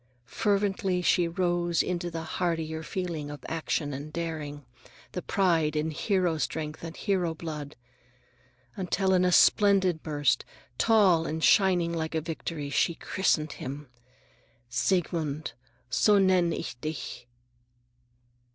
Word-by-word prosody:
Fervently 195 - 0
she 175 -1 +3
rose 175 -1 +1
into 175 -1 -2
the 165 -1 -5
hardier 160 -2 -2
feeling 165 -3 -4
of 145 0 -9
action 155 -2 -2
and 145 +3 -6
daring, 150 -4 -5 0.5
the 180 - -4
pride 165 -7 +1
in 155 +1 0
hero 175 -1 0
strength 155 0 -3
and 165 0 -7
hero 180 -5 0
blood, 150 -3 -6 1.0
until 190 0 0
in 185 -1 +4
a 180 - +3
splendid 190 -4 +4
burst, 145 -5 +1 0.4
tall 195 -8 +4
and 160 +1 -3
shining 180 -4 +4
like 160 -1 -3
a - - +2
Victory, 155 -1 -5
she 165 +4 +2
christened 155 -5 0
him:— 140 +1 -7 0.8
"Siegmund— 155 +1 -1 0.4
So 210 +8 +4
nenn 185 -3 +3
ich 120 - -5
dich!" 140 -5 -5
165 Hz, 125 wpm, -28 LUFS, 155-180 Hz, 1.0 s, in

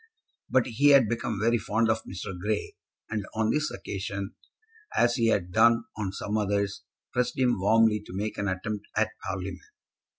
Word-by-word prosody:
But 130 -2 +3
he 130 +4 +2
had 135 -5 +7
become 115 -2 -2
very 115 +2 +2
fond 115 +2 +1
of 110 0 -1
Mr. 95 0 -6
Grey, 105 +4 -2 0.3
and 105 -1 -2
on 110 0 +2
this 150 +3 +1
occasion, 100 +1 -5 0.6
as 120 0 +4
he 115 -2 +2
had 95 -5 +1
done 115 +5 +5
on 105 -3 -3
some 105 +2 -2
others, 100 -1 -1 0.3
pressed 125 0 0
him 125 -5 +2
warmly 110 +2 +4
to - - -9
make 105 +2 -3
an 100 - -1
attempt 100 +2 -3
at - - +2
Parliament. 95 -1 -4
110 Hz, 170 wpm, -27 LUFS, 100-115 Hz, 0.6 s, had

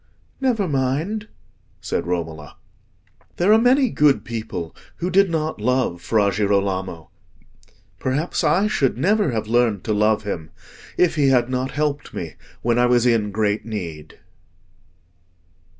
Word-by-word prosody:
"Never 240 -7 +1
mind," 155 +10 -1 0.5
said - - -3
Romola. 80 -4 -4 0.8
"There 190 +5 +4
are 220 - +5
many 255 0 +4
good 150 -2 +3
people 110 -8 -5 0.2
who 180 +2 -3
did 195 +1 +4
not 155 -7 -2
love 125 -7 0
Fra 100 +2 +2
Girolamo. 95 -4 -1 0.9
Perhaps 145 +6 -1
I 195 +5 +3
should 140 - +1
never 200 - +2
have 110 -3 -2
learned 115 -3 +1
to 110 - -1
love 105 +1 +2
him 85 -6 -5 0.5
if 175 -3 +2
he 145 -2 +3
had 125 -2 +3
not 130 +1 -1
helped 145 +1 -2
me - - -5 0.3
when 120 0 +2
I 125 - +4
was 120 -1 +3
in 115 -4 +2
great 105 0 0
need." 85 -9 -7
120 Hz, 135 wpm, -21 LUFS, 105-155 Hz, 0.9 s, are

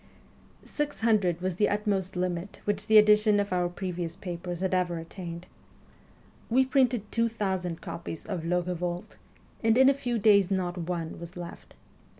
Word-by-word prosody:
Six 295 -4 -3
hundred 200 -7 +2
was 185 -1 -2
the 210 - +3
utmost 200 -3 -1
limit 180 +1 -3
which 205 - -1
the 220 - +7
edition 210 0 +6
of 200 -2 -1
our 180 -1 +1
previous 175 -2 -4
papers 175 -1 -5
had 190 0 0
ever 180 -2 +1
attained. 170 +1 -7 1.0
We 260 +3 +4
printed 255 -5 +1
two 230 0 +2
thousand 190 -6 -2
copies 165 -1 -6
of 185 -6 -4
'Le 180 +1 +1
Eevolte,' 180 +3 -4 0.5
and 225 +1 +4
in 265 +1 +7
a - - +5
few 245 -3 -2
days 200 -3 +5
not 185 -2 -1
one 170 -2 -4
was 170 +1 -9
left. 175 -1 -9
185 Hz, 160 wpm, -28 LUFS, 175-215 Hz, 1.0 s, the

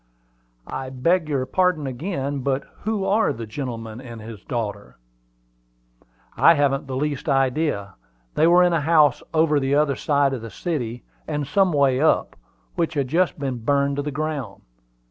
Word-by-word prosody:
"I 130 0 -5
beg 155 +6 +1
your 135 -3 0
pardon 180 +1 +1
again; 140 +1 -3
but 135 +1 -1 0.2
who 215 -3 -1
are 210 +3 +2
the 115 0 -6
gentleman 115 -1 -6
and 120 -3 -9
his 110 -3 -10
daughter?" 105 -4 -5 1.4
"I 165 - +6
haven't 140 -1 +1
the 130 - -4
least 145 +2 -2
idea. 135 -6 0 0.4
They 160 - +3
were 175 +1 +6
in 175 -1 +3
a 165 - +1
house 155 -1 +4
over 155 -2 +3
the 135 +1 +1
other 145 -2 +2
side 140 -1 +1
of 125 - -4
the 115 - -7
city, 125 - -4 0.2
and 150 -2 -2
some 185 +6 +2
way 140 -4 +3
up, 160 - +2 0.4
which 165 -1 -1
has 140 -2 +1
just 170 +7 +1
been 135 -4 -3
burned 140 +3 +1
to - - 0
the 145 - -3
ground. 145 -8 -4
140 Hz, 165 wpm, -23 LUFS, 130-155 Hz, 1.4 s, I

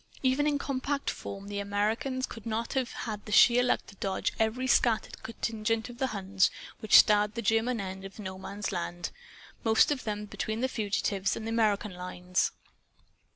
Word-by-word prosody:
Even 265 +3 +3
in 290 -1 +2
compact 275 0 -2
form, 200 0 -8
the 205 0 -4
Americans 220 +7 -1
could 225 -1 -10
not 225 +1 -2
have 260 -3 0
had 210 -3 -5
the - - -6
sheer 240 +4 +7
luck 250 - +1
to - - -13
dodge 195 0 -1
every 225 +4 +1
scattered 240 -3 +2
contingent 225 0 -2
of 240 - -14
Huns 195 -7 +1 0.3
which 215 - +6
starred 210 0 +5
the 235 - -2
German 225 +3 +2
end 190 -1 -5
of 195 0 -9
No 190 -3 -6
Man's 200 +1 -4
Land 175 -1 -4 0.5
most 225 +5 +4
of 280 -3 -1
them 210 -1 -3
between 220 +2 -3
the 260 - +2
fugitives 205 -4 -1
and 220 - -6
the - - -3
American 215 -3 +1
lines. 180 0 -1
220 Hz, 175 wpm, -29 LUFS, 200-240 Hz, 0.5 s, sheer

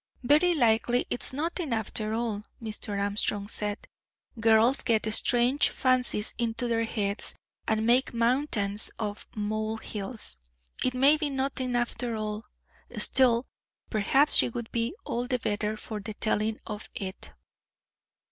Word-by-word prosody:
"Very 305 +7 +4
likely 240 -2 +2
it's - - +1
nothing, 320 +2 -3
after 220 -1 -2
all," 225 -3 -2 0.2
Mr. 215 -2 -5
Armstrong 200 0 0
said. 210 0 -3 0.5
"Girls 225 +3 +4
get 220 -3 +1
strange 245 +5 +4
fancies 250 -5 +1
into 235 +1 -1
their 230 -1 +1
heads, 205 -2 -2 0.3
and 220 0 +1
make 245 +3 +3
mountains 230 -4 +1
out 215 -2 -1
of - - -12
molehills. 215 - -3 0.5
It 255 - +1
may 275 +4 +6
be 300 -1 -1
nothing, 265 -2 -2
after 240 -1 -1
all; 215 +1 -4 0.5
still, 250 -2 +3 0.5
perhaps 270 +7 +3
she - - +6
would 235 -1 -6
be 235 +7 -1
all 245 +1 -2
the 255 -1 +1
better 210 -1 -2
for 215 0 -6
the 210 +1 -7
telling 215 0 0
of 210 -1 -7
it." 190 0 -6
230 Hz, 135 wpm, -28 LUFS, 215-250 Hz, 0.5 s, may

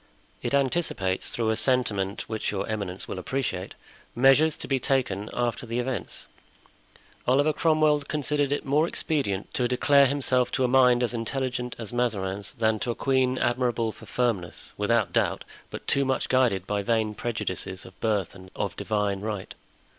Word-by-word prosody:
It - - 0
anticipates, 130 - 0
through 115 -2 0
a - - +1
sentiment 105 -6 0
which 110 -1 -2
your 95 -2 -2
eminence 100 -4 -3
will 95 - -4
appreciate, 95 -4 -3 0.4
measures 135 +5 +5
to - - -5
be 135 -1 +1
taken 120 -7 0
after 120 0 -2
the 115 +1 -2
events. 125 -4 -3 1.0
Oliver 145 +5 +4
Cromwell 155 -2 +3
considered 145 -1 0
it 145 - -1
more 150 +4 +3
expedient 135 - -2
to 125 - +1
declare 140 +3 +5
himself 130 -2 +1
to 130 - +1
a - - +4
mind 125 -1 +5
as 120 - 0
intelligent 125 +1 -2
as 115 -1 -7
Mazarin's 100 -5 -1
than 110 -1 +1
to 120 - -3
a 120 - 0
queen 130 -1 +1
admirable 120 -2 +1
for 110 - -14
firmness, 95 -5 -2
without 105 +1 +1
doubt, - - +1 0.3
but - - -8
too 140 - +2
much 130 0 -1
guided 120 -8 +2
by 105 0 -1
vain 110 0 +1
prejudices 105 -5 -3
of 95 - -14
birth 105 -5 0
and 95 -1 -13
of - - -2
divine 105 -2 -1
right. 105 -3 -4
120 Hz, 165 wpm, -26 LUFS, 105-130 Hz, 1.0 s, measures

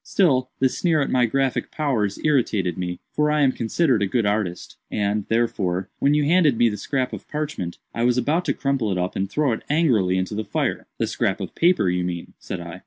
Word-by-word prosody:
Still, 130 -9 +2
the 130 - +3
sneer 160 +4 +1
at 140 - -1
my 125 -2 +3
graphic 135 +2 0
powers 115 -10 -1
irritated 110 - +1
me—for 90 +12 -2
I 150 0 +2
am 135 -2 +4
considered 125 0 +1
a 100 - +2
good 115 +2 0
artist—and, 100 +1 -2
therefore, 95 -6 0
when 145 +1 +3
you 150 -1 +2
handed 155 -5 +4
me 120 0 +4
the 105 - -4
scrap 130 +1 -2
of - - -7
parchment, 150 - -4 0.2
I 115 - -3
was 120 +1 +3
about 150 +8 +1
to - - +1
crumple 135 -6 0
it 95 - -1
up 90 +1 -2
and 95 0 -1
throw 145 +4 +1
it 110 - -2
angrily 120 - +2
into 95 +3 -2
the 110 +1 -2
fire." 105 - -2
"The - - 0
scrap - - -1
of - - -6
paper, 175 - +3
you 90 0 0
mean," 85 -1 -5
said 95 - -6
I. 85 +1 -8
120 Hz, 215 wpm, -23 LUFS, 95-145 Hz, 0.2 s, am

